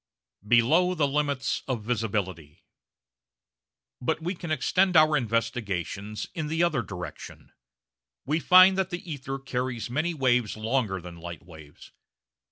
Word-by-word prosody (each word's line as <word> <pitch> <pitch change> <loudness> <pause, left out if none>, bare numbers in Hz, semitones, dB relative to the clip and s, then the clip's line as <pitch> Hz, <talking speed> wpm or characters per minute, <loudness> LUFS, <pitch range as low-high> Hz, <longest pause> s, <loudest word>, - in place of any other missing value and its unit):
Below 155 +11 +4
the 150 -4 +2
Limits 140 -1 -1
of 125 -5 -2
Visibility 100 -9 -3 1.4
But 140 +6 0
we 170 +3 -3
can 170 -2 -8
extend 180 +5 +2
our 155 0 +6
investigations 105 - -2
in 155 -2 -3
the 165 +2 0
other 155 -7 +1
direction; 90 -6 -9 0.7
we 155 +3 0
find 185 +3 +7
that 190 -1 0
the 175 +1 -6
ether 135 -3 -5
carries 125 -3 -4
many 160 +6 -1
waves 125 -6 +1
longer 110 -3 -1
than 85 -1 -10
light 85 -1 -8
waves. 80 -4 -14
125 Hz, 130 wpm, -27 LUFS, 105-155 Hz, 1.4 s, find